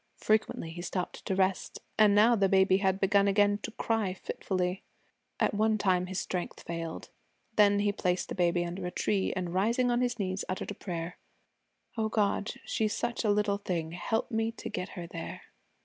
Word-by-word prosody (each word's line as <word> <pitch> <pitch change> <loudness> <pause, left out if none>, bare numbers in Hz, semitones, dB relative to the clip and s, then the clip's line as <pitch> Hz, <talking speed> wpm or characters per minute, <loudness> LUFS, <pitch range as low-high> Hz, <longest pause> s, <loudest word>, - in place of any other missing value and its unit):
Frequently 215 -6 0
he 175 +1 -7
stopped 180 0 -4
to 190 - 0
rest, 190 0 0 0.2
and 210 -2 +5
now 225 +3 +6
the 195 -3 +2
baby 190 0 +5
had 190 -1 +1
begun 200 0 +4
again 205 +1 +3
to - - -4
cry 220 -4 -1
fitfully. 185 0 -2 0.6
At - - +2
one 215 +1 +2
time 185 -3 +2
his 190 0 -4
strength 180 -1 -4
failed. 165 -1 -5 0.4
Then 205 -1 +5
he 205 0 +2
placed 180 -2 -1
the - - -3
baby 175 -1 +1
under 180 +1 -4
a - - -2
tree 190 +2 0
and 180 -2 -3
rising 235 +6 +2
on 240 +1 +2
his 245 -1 0
knees 190 -2 -2
uttered 185 +2 -3
a - - -3
prayer: 175 -3 -5 0.8
'O 220 0 +1
God, 205 -1 0
she's 215 -1 0
such 240 0 -2
a 215 - +2
little 205 -1 +2
thing, 170 -5 -2
help 180 +8 -2
me 225 0 0
to - - -7
get 180 +1 -4
her 175 - -4
there.' 170 -1 -7
195 Hz, 190 wpm, -30 LUFS, 180-210 Hz, 0.8 s, now